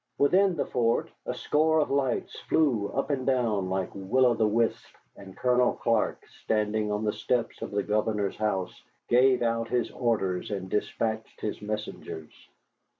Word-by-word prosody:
Within 185 +6 +4
the 150 - -1
fort 115 -2 0 0.2
a - - -1
score 160 +1 +2
of 150 - 0
lights 135 -3 -1
flew 125 -10 +2
up 135 +3 -2
and 135 -2 -1
down 115 -8 +1
like 95 -1 -2
will 100 +7 +2
o' 120 - +5
the 110 -2 +2
wisps, 115 +2 0 0.3
and 95 -1 -12
Colonel 125 0 +3
Clark, 115 -2 0 0.2
standing 105 0 0
on 105 +1 -1
the 105 - 0
steps 125 -2 -1
of - - -4
the 100 0 -1
governor's 105 -1 0
house, 95 -4 -2 0.3
gave 125 0 +4
out 115 0 0
his 120 -1 -1
orders 105 -7 -1
and 95 -3 -4
despatched 110 +1 -2
his 105 - -3
messengers. 105 -7 -6
115 Hz, 160 wpm, -28 LUFS, 105-125 Hz, 0.3 s, o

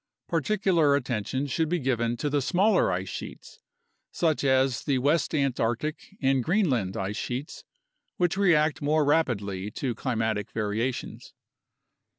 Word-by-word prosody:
Particular 170 -3 +2
attention 130 0 -2
should 155 +3 -1
be 175 - +1
given 120 -5 -1
to 145 - -2
the 145 -1 +1
smaller 190 - +3
ice 95 +1 -2
sheets, - - -8 0.5
such 160 -4 0
as 130 -2 +2
the 140 -2 +1
West 145 +5 +1
Antarctic 140 - -1
and 135 -2 +2
Greenland 135 - +1
ice 95 +2 -3
sheets, 130 +5 -5 0.5
which 175 0 +1
react 160 -6 +3
more 150 +1 +2
rapidly 105 -10 0
to 125 +3 -3
climatic 110 -4 -2
variations. 110 +4 -3
135 Hz, 130 wpm, -27 LUFS, 115-160 Hz, 0.5 s, smaller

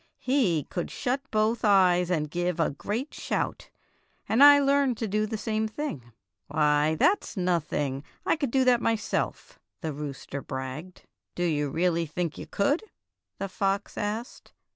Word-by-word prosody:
" - - -48
He 230 - +1
could 175 +4 -4
shut 260 +2 -2
both 215 +2 +1
eyes 180 -4 +4
and 155 -4 0
give 175 0 -1
a 165 - +2
great 215 - -4
shout, - - -3 0.6
and 235 +5 +5
I 290 0 +10
learned 280 -3 +2
to 225 - -2
do 215 +2 0
the 220 0 -3
same 220 +1 -1
thing." 215 - -5 0.4
"Why, 150 0 +2
that's 370 - +1
nothing! 150 -6 -1 0.2
I - - +3
could 285 -5 -2
do 265 +2 +3
that 245 -2 +4
myself," 225 -1 -2 0.2
the 160 -4 -3
rooster 140 -1 -6
bragged. 130 +8 -6 0.3
"Do 175 - -1
you 150 -4 0
really 170 +2 +1
think 165 +1 -3
you - - -7
could?" 285 - +1 0.5
the 195 - -3
fox 195 +1 -1
asked. 215 +4 -5
185 Hz, 160 wpm, -27 LUFS, 155-230 Hz, 0.6 s, I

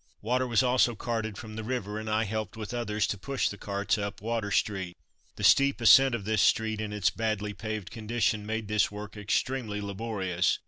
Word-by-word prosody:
Water 125 +3 +1
was 120 +1 +3
also 125 -1 +3
carted 110 -2 -3
from 110 0 -8
the 110 - -5
river, 110 -3 -3
and 110 0 -5
I 110 +1 +2
helped 110 +1 -4
with 110 +1 -6
others 110 -3 0
to 100 - -3
push 135 +6 -1
the 100 - -7
carts 100 0 -1
up 100 0 -4
Water 110 -1 -2
street. 95 -3 -1 0.4
The - - -7
steep 140 -1 +5
ascent 125 +3 +7
of 105 -4 -6
this 110 -1 +2
street 110 0 +2
in 105 -1 -4
its 105 -2 +1
badly 105 -2 -2
paved 110 -1 -5
condition 110 -1 -1
made 110 0 -3
this 105 0 +2
work 105 +1 -8
extremely 105 +1 -1
laborious. 100 -3 -1
110 Hz, 195 wpm, -28 LUFS, 105-115 Hz, 0.4 s, ascent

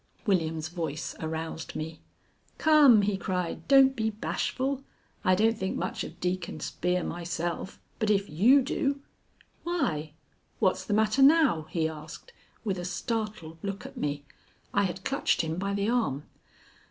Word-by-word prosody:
William's 160 -6 +1
voice 160 -4 -4
aroused 160 0 -4
me. 155 +1 -5 0.6
"Come!" 290 -9 +6
he 200 -1 +1
cried. 180 -2 -3
"Don't 270 -1 +6
be 220 -2 0
bashful. 260 +5 -2 0.4
I 185 -3 +4
don't 225 +4 +3
think 190 -2 -3
much - - -3
of - - -9
Deacon 180 -1 -2
Spear 180 0 -1
myself, 175 +1 -4 0.2
but 220 -2 +1
if 200 -1 +2
you 240 - +5
do 275 +1 -1 0.6
Why, 160 - -1 0.4
what's - - +1
the 205 - 0
matter 220 +4 +2
now?" 270 - +5
he 160 -2 0
asked, 155 - -9 0.3
with 195 -4 -1
a - - -4
startled 185 -3 -3
look 200 -1 -4
at - - -9
me. 145 -1 -3 0.5
I 200 - +3
had 185 0 -5
clutched 275 +1 +1
him 160 0 -3
by 200 +1 -1
the 200 +2 0
arm. 225 - 0
190 Hz, 150 wpm, -28 LUFS, 165-225 Hz, 0.6 s, Come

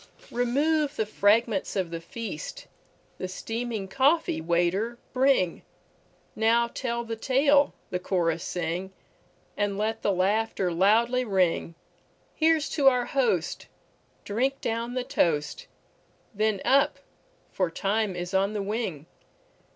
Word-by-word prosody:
Remove 285 +5 +1
the 220 - 0
fragments 210 0 +2
of 185 -4 -1
the 165 -1 -5
feast! 235 - -7 0.5
The 185 - -3
steaming 225 +1 -4
coffee, 270 - +2
waiter, 175 +8 0 0.2
bringNow 235 -1 -1
tell 235 -2 -2
the 230 -1 -4
tale, 280 +4 +3 0.2
the 180 - -1
chorus 170 -3 0
sing, 180 +2 -3 0.6
And 205 -1 -1
let 220 +2 -1
the 205 - +1
laughter 195 0 0
loudly 225 +8 +3
ring; 185 -6 0 0.6
Here 320 0 +3
's 295 - -3
to 285 -4 +2
our 250 -2 +4
host, 235 - 0 0.6
drink 260 +6 0
down 235 +2 -3
the 255 - -1
toast, 165 - 0 0.7
Then 215 -1 0
up! 275 +2 +3 0.5
for 185 -3 0
time 200 +3 -1
is 180 +1 -5
on 195 +2 +2
the 205 -2 -2
wing. 195 -8 -3
220 Hz, 120 wpm, -27 LUFS, 185-250 Hz, 0.7 s, our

